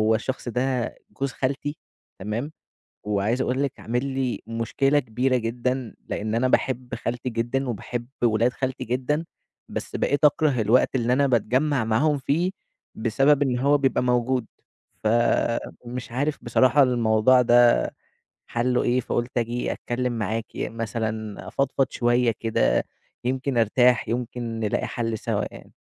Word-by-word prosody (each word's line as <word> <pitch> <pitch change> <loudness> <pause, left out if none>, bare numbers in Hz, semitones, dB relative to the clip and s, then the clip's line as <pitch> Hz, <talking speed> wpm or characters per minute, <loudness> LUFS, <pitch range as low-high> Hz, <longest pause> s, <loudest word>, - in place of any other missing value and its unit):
الشخص 125 +2 -3
ده 125 0 -1 0.2
جوز 135 0 -3
خالتي، 140 +3 -2 0.4
تمام، 110 +9 -3 0.6
وعايز 105 +4 0
أقول 130 +2 0
لِك 140 - 0
عامل 120 +3 -1
لي 135 -2 -2
مشكلة 115 +5 +1
كبيرة 130 0 0
جدًا، 125 +1 -2
لإن 110 +1 -2
أنا 125 +3 +2
باحب 125 -1 0
خالتي 120 +1 -3
جدًا 120 +4 -1
وباحب 120 +1 -4 0.2
ولاد 115 +2 +3
خالتي 130 0 -3
جدًا، 130 +6 -1 0.4
بس - - -5
بقيت 145 +2 0
أكره 150 -3 +3
الوقت 115 +5 +3
اللي 120 -1 +1
أنا 140 +2 +3
باتجمّع 130 +2 +1
معاهم 140 +7 +2
فيه، 160 +7 0 0.4
بسبب 135 +6 +3
إن 125 -3 +1
هو 140 +3 +3
بيبقى 135 -2 +1
موجود، 125 0 +1 0.6
فمش 120 +1 0
عارف 145 +4 -1
بصراحة 130 +4 +4
الموضوع 120 0 +4
ده 120 0 +5 0.6
حلُّه 125 +1 0
إيه، 125 +1 +2
فقُلت 120 +1 -2
آجي 120 +1 -1
أتكلّم 125 +1 -2
معاكِ 110 +1 -2
مثلًا، 110 -1 -4
أفضفض 135 0 +1
شوية 120 0 +2
كده 110 - +2 0.4
يمكن 130 0 -1
أرتاح، 120 +2 +3
يمكن 120 -1 -3
نلاقي 105 -2 0
حل 115 -2 -2
سوا - - -1
يعني. - - -13
125 Hz, 135 wpm, -24 LUFS, 115-130 Hz, 0.6 s, ده